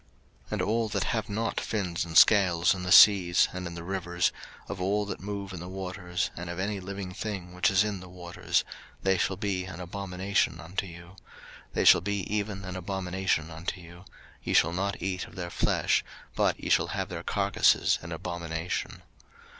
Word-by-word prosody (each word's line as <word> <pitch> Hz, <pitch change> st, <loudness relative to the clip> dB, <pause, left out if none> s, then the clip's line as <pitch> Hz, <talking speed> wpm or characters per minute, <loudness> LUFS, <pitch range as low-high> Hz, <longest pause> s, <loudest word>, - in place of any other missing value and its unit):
03:011:010 -, -, -21 dB
And -, -, 0 dB
all 110 Hz, +1 st, 0 dB
that -, -, -1 dB
have 110 Hz, -2 st, -2 dB
not 110 Hz, +3 st, -1 dB
fins 95 Hz, -5 st, -2 dB
and 80 Hz, -1 st, -1 dB
scales 90 Hz, -5 st, +6 dB
in 95 Hz, -, -6 dB
the 90 Hz, 0 st, -3 dB
seas, 90 Hz, -4 st, +7 dB
and 90 Hz, -1 st, -4 dB
in 85 Hz, -, -7 dB
the 85 Hz, -, -7 dB
rivers, 90 Hz, -1 st, 0 dB, 0.4 s
of 90 Hz, -, -5 dB
all 100 Hz, +3 st, +1 dB
that 100 Hz, -, -5 dB
move 100 Hz, -1 st, -5 dB
in 90 Hz, -, -6 dB
the 90 Hz, -, -7 dB
waters, 95 Hz, -1 st, -3 dB
and 85 Hz, +1 st, -6 dB
of 85 Hz, -, -5 dB
any 100 Hz, +2 st, -2 dB
living 95 Hz, 0 st, -6 dB
thing 95 Hz, -4 st, -5 dB
which 90 Hz, 0 st, +2 dB
is 100 Hz, 0 st, +4 dB
in 105 Hz, -2 st, -3 dB
the 90 Hz, 0 st, -11 dB
waters, 90 Hz, -1 st, -1 dB, 0.4 s
they 95 Hz, 0 st, +3 dB
shall 95 Hz, -, +1 dB
be 95 Hz, -2 st, -2 dB
an 90 Hz, -2 st, -8 dB
abomination 95 Hz, 0 st, -1 dB
unto 90 Hz, +3 st, -4 dB
you: 85 Hz, 0 st, -10 dB
03:011:011 90 Hz, +3 st, -17 dB, 0.6 s
They -, -, +1 dB
shall -, -, +8 dB
be 100 Hz, +1 st, -2 dB
even 100 Hz, -2 st, -3 dB
an 90 Hz, 0 st, -6 dB
abomination 95 Hz, -3 st, -2 dB
unto 80 Hz, +3 st, -5 dB
you; 85 Hz, +1 st, -13 dB, 0.4 s
ye -, -, -2 dB
shall 85 Hz, -, +4 dB
not 100 Hz, +3 st, -2 dB
eat 95 Hz, -1 st, -2 dB
of -, -, -16 dB
their 90 Hz, -2 st, -5 dB
flesh, -, -, +1 dB, 0.3 s
but -, -, +1 dB
ye -, -, -3 dB
shall -, -, +4 dB
have -, -, -3 dB
their -, -, -5 dB
carcases -, -, +2 dB
in -, -, -9 dB
abomination. 85 Hz, -1 st, -4 dB
95 Hz, 195 wpm, -28 LUFS, 85-100 Hz, 0.6 s, shall